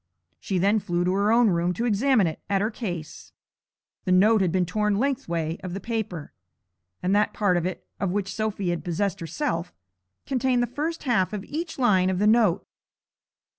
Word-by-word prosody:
She 190 Hz, -, -2 dB
then 200 Hz, +4 st, +3 dB
flew 175 Hz, -2 st, -1 dB
to 180 Hz, -, +1 dB
her 200 Hz, +2 st, +2 dB
own 230 Hz, -2 st, +5 dB
room 175 Hz, +1 st, 0 dB
to 235 Hz, -, -1 dB
examine 235 Hz, 0 st, +3 dB
it 160 Hz, -, -3 dB
at 200 Hz, -1 st, +2 dB
her 215 Hz, +3 st, 0 dB
case. 175 Hz, -9 st, -6 dB, 0.7 s
The 185 Hz, -, 0 dB
note 205 Hz, +4 st, +5 dB
had 185 Hz, -3 st, +2 dB
been 185 Hz, 0 st, +1 dB
torn 210 Hz, +3 st, 0 dB
lengthway 170 Hz, -, -1 dB
of 180 Hz, -1 st, -5 dB
the -, -, -3 dB
paper, 200 Hz, -7 st, -4 dB, 0.7 s
and 185 Hz, +2 st, +2 dB
that 210 Hz, -, +2 dB
part 200 Hz, -4 st, +2 dB
of 175 Hz, 0 st, 0 dB
it 185 Hz, -, -6 dB
of 195 Hz, -, 0 dB
which 195 Hz, +1 st, -2 dB
Sophy 215 Hz, -4 st, -2 dB
had 175 Hz, -, -3 dB
possessed 190 Hz, +3 st, -1 dB
herself 170 Hz, -, -3 dB, 0.5 s
contained 255 Hz, -2 st, +1 dB
the -, -, +2 dB
first 300 Hz, +7 st, -4 dB
half 220 Hz, -8 st, +1 dB
of 205 Hz, -2 st, -4 dB
each 325 Hz, +3 st, -5 dB
line 195 Hz, -8 st, +3 dB
of 185 Hz, -, 0 dB
the 205 Hz, -, +1 dB
note. 215 Hz, -4 st, +3 dB
200 Hz, 190 wpm, -25 LUFS, 180-225 Hz, 0.7 s, own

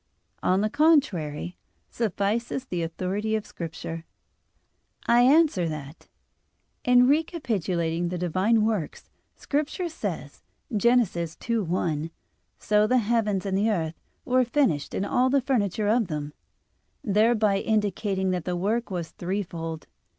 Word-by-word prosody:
On 185 Hz, +2 st, +2 dB
the 215 Hz, -, +1 dB
contrary, 190 Hz, -, +2 dB, 0.3 s
Suffices 230 Hz, +4 st, -1 dB
the 180 Hz, -8 st, -3 dB
authority 190 Hz, +6 st, -2 dB
of 215 Hz, -, -2 dB
Scripture. 165 Hz, 0 st, -6 dB, 1.0 s
I 240 Hz, +1 st, +5 dB
answer 265 Hz, -, +4 dB
that, 150 Hz, 0 st, -8 dB, 0.8 s
In 250 Hz, 0 st, +5 dB
recapitulating 190 Hz, -, 0 dB
the 180 Hz, -, -3 dB
Divine 190 Hz, +6 st, +2 dB
works, 210 Hz, -9 st, -3 dB, 0.2 s
Scripture 305 Hz, +5 st, -2 dB
says 320 Hz, -, -5 dB, 0.3 s
(Gen. 240 Hz, +4 st, +5 dB
2:1): 170 Hz, -4 st, -2 dB, 0.5 s
"So 210 Hz, 0 st, +2 dB
the 255 Hz, -, +3 dB
heavens 215 Hz, -4 st, +1 dB
and 195 Hz, -1 st, -1 dB
the 205 Hz, +3 st, +2 dB
earth 165 Hz, -6 st, -2 dB, 0.2 s
were 255 Hz, 0 st, +3 dB
finished 235 Hz, -, 0 dB
and 195 Hz, -, -1 dB
all 250 Hz, +5 st, +2 dB
the 280 Hz, +1 st, +3 dB
furniture 215 Hz, -6 st, 0 dB
of 225 Hz, 0 st, +2 dB
them," 150 Hz, -2 st, -4 dB, 0.7 s
thereby 215 Hz, -1 st, +3 dB
indicating 200 Hz, -3 st, 0 dB
that 180 Hz, -3 st, -2 dB
the 180 Hz, -, -1 dB
work 220 Hz, +7 st, -1 dB
was 175 Hz, -4 st, -4 dB
threefold. 170 Hz, -4 st, -4 dB
205 Hz, 120 wpm, -26 LUFS, 175-235 Hz, 1.0 s, I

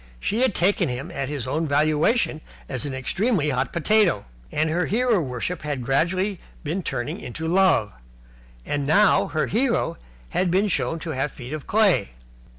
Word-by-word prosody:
She 220 Hz, -, -1 dB
had 255 Hz, -6 st, +2 dB
taken 180 Hz, -3 st, +2 dB
him 125 Hz, +2 st, -4 dB
at 135 Hz, -1 st, -3 dB
his 140 Hz, -4 st, -3 dB
own 155 Hz, +5 st, -1 dB
valuation 155 Hz, -, +2 dB, 0.3 s
as 130 Hz, +1 st, -2 dB
an 140 Hz, -, -4 dB
extremely 160 Hz, -, 0 dB
hot 130 Hz, 0 st, -1 dB
potato, 180 Hz, -, +2 dB, 0.3 s
and 155 Hz, +1 st, +1 dB
her 170 Hz, +3 st, 0 dB
hero 235 Hz, 0 st, +2 dB
worship 135 Hz, +5 st, -3 dB
had 140 Hz, -4 st, -3 dB
gradually 180 Hz, -, +1 dB, 0.2 s
been 165 Hz, +5 st, -2 dB
turning 120 Hz, -8 st, -3 dB
into 160 Hz, +7 st, -5 dB
love. 175 Hz, -, +3 dB, 0.7 s
And 145 Hz, -1 st, -2 dB
now 200 Hz, +6 st, +4 dB
her 155 Hz, -, 0 dB
hero 230 Hz, -7 st, 0 dB, 0.3 s
had 185 Hz, 0 st, 0 dB
been 195 Hz, +4 st, +2 dB
shown 140 Hz, -1 st, 0 dB
to 165 Hz, -, -4 dB
have 135 Hz, 0 st, -1 dB
feet 125 Hz, +2 st, -8 dB
of 155 Hz, -3 st, -6 dB
clay. 200 Hz, -, +3 dB
160 Hz, 165 wpm, -24 LUFS, 140-195 Hz, 0.7 s, now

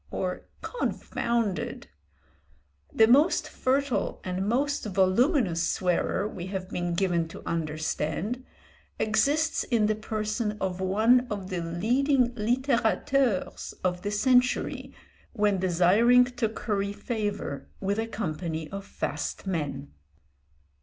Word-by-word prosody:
or 185 Hz, -1 st, -3 dB, 0.2 s
"confounded!" 235 Hz, -, -2 dB, 1.1 s
The 220 Hz, -, +5 dB
most 285 Hz, +9 st, +4 dB
fertile 270 Hz, 0 st, 0 dB
and 185 Hz, +2 st, -2 dB
most 280 Hz, +5 st, 0 dB
voluminous 195 Hz, -, +2 dB
swearer, 185 Hz, +2 st, 0 dB
we 185 Hz, -4 st, -7 dB
have 190 Hz, -1 st, -5 dB
been 175 Hz, -1 st, -2 dB
given 170 Hz, -3 st, +1 dB
to -, -, -11 dB
understand, 160 Hz, -, -2 dB, 0.5 s
exists 290 Hz, +8 st, +2 dB
in 230 Hz, -4 st, +1 dB
the 215 Hz, -, +2 dB
person 215 Hz, 0 st, -2 dB
of 190 Hz, -1 st, -2 dB
one 225 Hz, +7 st, +3 dB
of 200 Hz, -3 st, -5 dB
the 180 Hz, -2 st, -2 dB
leading 245 Hz, -, +1 dB
littérateurs 240 Hz, -1 st, 0 dB
of 180 Hz, -1 st, 0 dB
the 205 Hz, -, -2 dB
century 250 Hz, +4 st, +2 dB, 0.4 s
when 205 Hz, -4 st, +2 dB
desiring 190 Hz, +8 st, +5 dB
to 245 Hz, -3 st, -2 dB
curry 200 Hz, -2 st, -2 dB
favour 205 Hz, -, -4 dB
with 200 Hz, +2 st, -1 dB
a 225 Hz, -, -1 dB
company 160 Hz, -6 st, -4 dB
of 195 Hz, 0 st, -5 dB
fast -, -, -4 dB
men. 145 Hz, -6 st, -3 dB
210 Hz, 110 wpm, -27 LUFS, 185-240 Hz, 1.1 s, The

